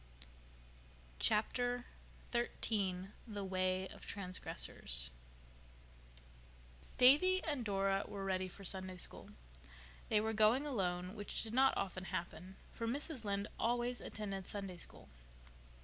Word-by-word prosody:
Chapter 245 Hz, -, +2 dB, 0.5 s
XIII 195 Hz, -5 st, 0 dB, 0.2 s
The 205 Hz, -2 st, -4 dB
Way 185 Hz, 0 st, +1 dB
of -, -, -11 dB
Transgressors 60 Hz, -, -1 dB, 1.9 s
Davy 335 Hz, +9 st, +7 dB
and 290 Hz, -6 st, -1 dB
Dora 195 Hz, -1 st, +1 dB
were 195 Hz, -1 st, -5 dB
ready 185 Hz, -1 st, 0 dB
for 195 Hz, +2 st, -10 dB
Sunday 185 Hz, -1 st, 0 dB
School. -, -, -2 dB, 0.8 s
They 215 Hz, -, +5 dB
were 220 Hz, +1 st, 0 dB
going 220 Hz, +6 st, +5 dB
alone, 180 Hz, -8 st, -1 dB
which 205 Hz, -2 st, -2 dB
did 225 Hz, -1 st, -4 dB
not 265 Hz, +2 st, +5 dB
often 190 Hz, -1 st, -2 dB
happen, 180 Hz, +1 st, -4 dB, 0.2 s
for 230 Hz, -, -3 dB
Mrs. 275 Hz, +1 st, -2 dB
Lynde 200 Hz, 0 st, 0 dB
always 240 Hz, +1 st, +1 dB
attended 195 Hz, -3 st, -4 dB
Sunday 195 Hz, -3 st, -4 dB
School. -, -, -10 dB
200 Hz, 115 wpm, -37 LUFS, 185-240 Hz, 1.9 s, Davy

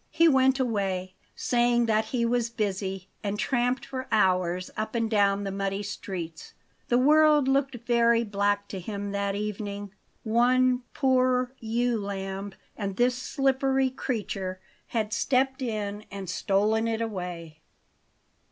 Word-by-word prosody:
He 330 Hz, +1 st, +4 dB
went 265 Hz, -2 st, +4 dB
away, 195 Hz, -6 st, -1 dB, 0.2 s
saying 240 Hz, -1 st, +2 dB
that 220 Hz, -1 st, +2 dB
he 235 Hz, +1 st, -1 dB
was 235 Hz, 0 st, +1 dB
busy, 195 Hz, -4 st, -3 dB, 0.2 s
and 205 Hz, 0 st, -2 dB
tramped 245 Hz, +2 st, 0 dB
for 260 Hz, -1 st, -5 dB
hours 185 Hz, -4 st, +2 dB
up 220 Hz, +2 st, -3 dB
and 230 Hz, -1 st, +1 dB
down 200 Hz, -2 st, +2 dB
the 195 Hz, -, -3 dB
muddy 195 Hz, +1 st, -2 dB
streets. 175 Hz, -5 st, -6 dB, 0.3 s
The 240 Hz, -, +3 dB
world 300 Hz, +1 st, +5 dB
looked 275 Hz, -1 st, +1 dB
very 235 Hz, -1 st, +4 dB
black 205 Hz, -1 st, 0 dB
to 195 Hz, -, -5 dB
him 200 Hz, +2 st, -5 dB
that 200 Hz, 0 st, -1 dB
evening. 205 Hz, -1 st, -4 dB, 0.3 s
One 250 Hz, +2 st, +3 dB
poor 255 Hz, -2 st, +2 dB
ewe 235 Hz, 0 st, 0 dB
lamb 195 Hz, 0 st, -5 dB, 0.2 s
and 200 Hz, -3 st, -4 dB
this 245 Hz, +1 st, +3 dB
slippery 265 Hz, 0 st, +1 dB
creature 195 Hz, -7 st, -3 dB, 0.3 s
had 215 Hz, -2 st, -2 dB
stepped 265 Hz, +4 st, +1 dB
in 210 Hz, -3 st, -3 dB
and 195 Hz, -1 st, -7 dB
stolen 210 Hz, +5 st, +1 dB
it 225 Hz, 0 st, -1 dB
away. 175 Hz, -7 st, -6 dB
220 Hz, 135 wpm, -27 LUFS, 200-250 Hz, 0.3 s, world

